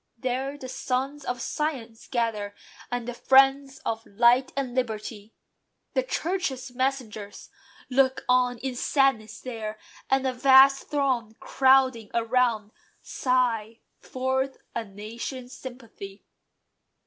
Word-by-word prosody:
There 260 Hz, +3 st, -2 dB
The 260 Hz, -, -8 dB
sons 270 Hz, +2 st, -2 dB
of 245 Hz, -1 st, -3 dB
science 255 Hz, -8 st, -4 dB
gather, 225 Hz, -5 st, -2 dB, 0.4 s
and 245 Hz, -1 st, -3 dB
the 245 Hz, -, -3 dB
friends 270 Hz, +2 st, +4 dB
Of 225 Hz, 0 st, -2 dB
light 240 Hz, +5 st, +4 dB
and 260 Hz, -3 st, -2 dB
liberty. 220 Hz, -3 st, -4 dB, 0.6 s
The -, -, +2 dB
Churches' 320 Hz, -, -3 dB
messengers 245 Hz, -6 st, -3 dB, 0.4 s
Look 260 Hz, 0 st, +2 dB
on 250 Hz, -1 st, +3 dB
in 260 Hz, +2 st, -4 dB
sadness 245 Hz, -5 st, +1 dB
there; 220 Hz, -4 st, -5 dB, 0.3 s
and 270 Hz, 0 st, +2 dB
a 260 Hz, -, +1 dB
vast 270 Hz, +1 st, +6 dB
throng, 255 Hz, -6 st, 0 dB
Crowding 260 Hz, -4 st, +3 dB
around, 230 Hz, -2 st, +1 dB, 0.3 s
sigh 235 Hz, -3 st, 0 dB, 0.2 s
forth 260 Hz, +1 st, -2 dB, 0.2 s
a 230 Hz, -, -2 dB
nation's 230 Hz, +5 st, -7 dB
sympathy. 230 Hz, -6 st, -10 dB
250 Hz, 115 wpm, -26 LUFS, 225-270 Hz, 0.6 s, vast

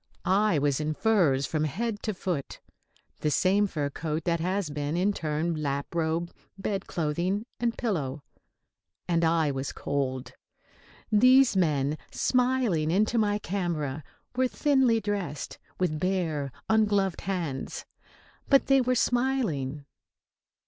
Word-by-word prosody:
I 200 Hz, -2 st, +3 dB
was 145 Hz, -1 st, +1 dB
in 155 Hz, 0 st, -2 dB
furs 170 Hz, -12 st, +3 dB
from 155 Hz, +1 st, -1 dB
head 205 Hz, -, -3 dB
to 215 Hz, -3 st, -3 dB
foot 175 Hz, -7 st, -3 dB, 0.6 s
the 155 Hz, -, 0 dB
same 195 Hz, +6 st, +3 dB
fur 145 Hz, -6 st, -2 dB
coat 155 Hz, +1 st, -3 dB
that 170 Hz, -1 st, 0 dB
has 185 Hz, -1 st, -1 dB
been, 145 Hz, +2 st, -2 dB
in 195 Hz, +3 st, +2 dB
turn, 160 Hz, 0 st, -1 dB
lap 140 Hz, +1 st, -2 dB
robe, 165 Hz, +1 st, -1 dB, 0.3 s
bed 195 Hz, 0 st, -3 dB
clothing 175 Hz, +6 st, -1 dB
and 235 Hz, -1 st, 0 dB
pillow 150 Hz, -, -2 dB, 0.8 s
and 170 Hz, -1 st, +1 dB
I 160 Hz, -2 st, +3 dB
was 135 Hz, 0 st, -3 dB
cold. 130 Hz, -2 st, -3 dB, 0.8 s
These 255 Hz, +3 st, +6 dB
men, 150 Hz, -4 st, +1 dB
smiling 250 Hz, -11 st, +1 dB
into 215 Hz, +6 st, +2 dB
my 205 Hz, -1 st, +2 dB
camera, 165 Hz, -8 st, -3 dB, 0.3 s
were 255 Hz, +1 st, +3 dB
thinly 265 Hz, -4 st, +3 dB
dressed, 200 Hz, -8 st, -4 dB, 0.2 s
with 165 Hz, -5 st, 0 dB
bare, 165 Hz, -7 st, -1 dB, 0.2 s
ungloved 205 Hz, -4 st, +2 dB
hands. 170 Hz, -8 st, -3 dB, 0.6 s
But 275 Hz, -1 st, +5 dB
they 270 Hz, -1 st, +4 dB
were 255 Hz, 0 st, +1 dB
smiling. 225 Hz, -, 0 dB
175 Hz, 130 wpm, -28 LUFS, 150-210 Hz, 0.8 s, These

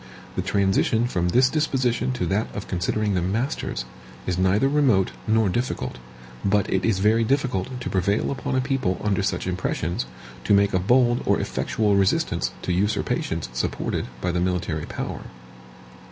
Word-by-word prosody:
The -, -, 0 dB
transition 100 Hz, +3 st, +2 dB
from 90 Hz, -8 st, 0 dB
this 125 Hz, +7 st, +5 dB
disposition 130 Hz, -4 st, 0 dB
to 125 Hz, -, -2 dB
that 100 Hz, +3 st, 0 dB
of 105 Hz, -, -5 dB
considering 100 Hz, +3 st, 0 dB
them 90 Hz, 0 st, 0 dB
masters, 120 Hz, +7 st, -2 dB, 0.4 s
is 90 Hz, -, 0 dB
neither 95 Hz, +7 st, +3 dB
remote 135 Hz, -10 st, +3 dB, 0.2 s
nor 110 Hz, -1 st, +3 dB
difficult; 95 Hz, -, -2 dB, 0.4 s
but 100 Hz, 0 st, +2 dB
it 95 Hz, -, +1 dB
is 110 Hz, -4 st, +2 dB
very 110 Hz, +4 st, +3 dB
difficult 125 Hz, -1 st, -1 dB
to -, -, -5 dB
prevail 100 Hz, +3 st, +1 dB
upon 135 Hz, -1 st, -2 dB
a 130 Hz, -, +2 dB
people 130 Hz, -9 st, -1 dB
under 105 Hz, -1 st, +1 dB
such 95 Hz, -, -1 dB
impressions, 90 Hz, -5 st, -2 dB, 0.4 s
to 105 Hz, -, +5 dB
make 100 Hz, 0 st, +3 dB
a 95 Hz, -, +3 dB
bold 120 Hz, +5 st, +3 dB
or -, -, +3 dB
effectual 105 Hz, -2 st, 0 dB
resistance 95 Hz, -1 st, +1 dB
to 90 Hz, -, 0 dB
usurpations 85 Hz, -5 st, -1 dB
supported -, -, -2 dB
by 90 Hz, -, 0 dB
the 85 Hz, 0 st, 0 dB
military 90 Hz, -4 st, -1 dB
power. -, -, -5 dB
100 Hz, 160 wpm, -24 LUFS, 95-120 Hz, 0.4 s, this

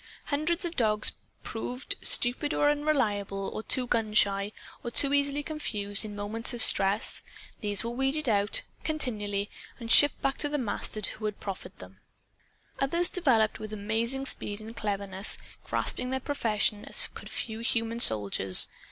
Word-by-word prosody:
Hundreds 335 Hz, +5 st, 0 dB
of 340 Hz, 0 st, -4 dB
dogs 215 Hz, -3 st, +1 dB, 0.3 s
proved 250 Hz, -, -4 dB
stupid 255 Hz, +5 st, 0 dB
or 290 Hz, 0 st, +3 dB
unreliable 215 Hz, -10 st, -1 dB
or 250 Hz, +3 st, -1 dB
gun 220 Hz, -3 st, -1 dB
shy 200 Hz, -1 st, +3 dB, 0.3 s
or 240 Hz, -, -3 dB
too 280 Hz, +4 st, +3 dB
easily 285 Hz, 0 st, +1 dB
confused 210 Hz, -10 st, -3 dB
in 210 Hz, -1 st, -7 dB
moments 220 Hz, +4 st, -1 dB
of 235 Hz, -, -3 dB
stress. 200 Hz, 0 st, +3 dB, 0.4 s
These 205 Hz, -2 st, -1 dB
were 230 Hz, -, -3 dB
weeded 270 Hz, +4 st, 0 dB
out, 205 Hz, -2 st, +1 dB, 0.2 s
continually, 210 Hz, -10 st, 0 dB, 0.3 s
and 230 Hz, -1 st, -3 dB
shipped 290 Hz, -, +7 dB
back 270 Hz, -1 st, 0 dB
to 290 Hz, -, 0 dB
the 295 Hz, -, -1 dB
masters 215 Hz, -3 st, 0 dB
who 215 Hz, -, -7 dB
had 210 Hz, -1 st, -3 dB
proffered 185 Hz, -2 st, -7 dB
them. 95 Hz, +1 st, -13 dB, 0.8 s
Others 335 Hz, +6 st, +1 dB
developed 235 Hz, -, +2 dB
with 215 Hz, -1 st, -7 dB
amazing 225 Hz, +6 st, -1 dB
speed 205 Hz, -5 st, -2 dB
and 220 Hz, +2 st, -5 dB
cleverness, 200 Hz, -2 st, -2 dB, 0.3 s
grasping 250 Hz, -, 0 dB
their 265 Hz, 0 st, -1 dB
profession 220 Hz, -7 st, -1 dB
as -, -, +3 dB
could -, -, -9 dB
few 220 Hz, -1 st, -4 dB
human 230 Hz, 0 st, -1 dB
soldiers. 100 Hz, -, +5 dB
225 Hz, 150 wpm, -28 LUFS, 205-270 Hz, 0.8 s, shipped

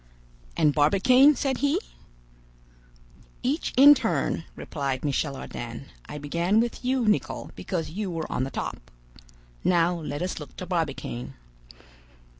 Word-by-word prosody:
"And 150 Hz, -2 st, +4 dB
Barbicane?" 250 Hz, -, +5 dB
said 265 Hz, 0 st, -1 dB
he. 285 Hz, +5 st, +2 dB, 1.6 s
"Each 285 Hz, +6 st, -1 dB
in 285 Hz, +2 st, +10 dB
turn," -, -, -1 dB
replied 140 Hz, -2 st, -3 dB
Michel 140 Hz, 0 st, -1 dB
Ardan. 120 Hz, 0 st, -7 dB, 0.2 s
"I 150 Hz, -, -6 dB
began 170 Hz, +8 st, +1 dB
with 235 Hz, +2 st, -1 dB
you, 255 Hz, -2 st, +1 dB
Nicholl, 210 Hz, -, 0 dB
because 165 Hz, -5 st, -4 dB
you 200 Hz, +3 st, -3 dB
were 165 Hz, -2 st, -3 dB
on 130 Hz, -, 0 dB
the 135 Hz, -, -3 dB
top. -, -, -6 dB, 0.7 s
Now 175 Hz, -1 st, +3 dB
let 155 Hz, -2 st, -4 dB
us 180 Hz, -, -3 dB
look 145 Hz, -5 st, -10 dB
to 185 Hz, -, -5 dB
Barbicane." 135 Hz, -, -3 dB
170 Hz, 130 wpm, -26 LUFS, 145-235 Hz, 1.6 s, in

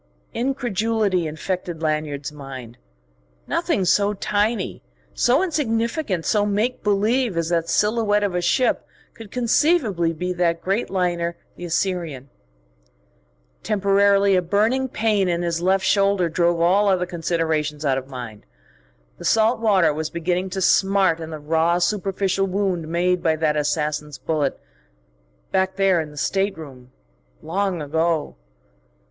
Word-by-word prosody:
Incredulity 225 Hz, -, 0 dB
infected 170 Hz, +1 st, -4 dB
Lanyard's 150 Hz, -2 st, -2 dB
mind. 130 Hz, -5 st, -10 dB, 0.7 s
Nothing 190 Hz, -, 0 dB
so 205 Hz, +3 st, +2 dB
tiny, 210 Hz, +1 st, -1 dB, 0.3 s
so 260 Hz, +8 st, +3 dB
insignificant, 235 Hz, -, -1 dB
so 210 Hz, -1 st, +2 dB
make 210 Hz, +5 st, -1 dB
believe 210 Hz, +1 st, +1 dB
as 165 Hz, -1 st, 0 dB
that 170 Hz, -1 st, 0 dB
silhouette 210 Hz, -1 st, +2 dB
of 200 Hz, -3 st, -1 dB
a 180 Hz, -, 0 dB
ship 250 Hz, +8 st, +1 dB, 0.3 s
could 225 Hz, -2 st, -12 dB
conceivably 235 Hz, -, +2 dB
be 180 Hz, +3 st, -3 dB
that 170 Hz, -2 st, 0 dB
great 195 Hz, +5 st, -1 dB
liner, 175 Hz, -2 st, -1 dB, 0.2 s
the 175 Hz, -, -8 dB
Assyrian.... 165 Hz, -6 st, -2 dB, 1.3 s
Temporarily 200 Hz, -1 st, +3 dB
a 180 Hz, -, +3 dB
burning 220 Hz, +9 st, +1 dB
pain 210 Hz, -5 st, +1 dB
in 175 Hz, 0 st, -1 dB
his 170 Hz, -1 st, -1 dB
left 190 Hz, +1 st, +2 dB
shoulder 195 Hz, -2 st, +2 dB
drove 170 Hz, +1 st, +1 dB
all 190 Hz, +5 st, +3 dB
other 185 Hz, -2 st, +2 dB
considerations 160 Hz, -3 st, -2 dB
out 135 Hz, -1 st, +2 dB
of 130 Hz, -, -12 dB
mind. 120 Hz, -, -9 dB, 0.7 s
The -, -, -8 dB
salt 225 Hz, +2 st, +3 dB
water 190 Hz, -8 st, +3 dB
was 155 Hz, +1 st, -3 dB
beginning 175 Hz, +3 st, -2 dB
to 190 Hz, +1 st, -4 dB
smart 190 Hz, -2 st, +3 dB
in 160 Hz, -1 st, -6 dB
the 155 Hz, -, -6 dB
raw, 160 Hz, +3 st, +1 dB
superficial 195 Hz, +1 st, 0 dB
wound 185 Hz, -4 st, -1 dB
made 175 Hz, +2 st, +1 dB
by 160 Hz, -2 st, +2 dB
that 155 Hz, -1 st, 0 dB
assassin's 150 Hz, -1 st, -2 dB
bullet... 145 Hz, +1 st, -1 dB, 0.9 s
back 190 Hz, 0 st, +1 dB
there 190 Hz, -3 st, +3 dB
in 155 Hz, -, -7 dB
the 150 Hz, -, -14 dB
stateroom... 155 Hz, -9 st, -3 dB, 0.5 s
long 180 Hz, 0 st, -1 dB
ago.... 160 Hz, +1 st, -1 dB
180 Hz, 135 wpm, -22 LUFS, 160-205 Hz, 1.3 s, so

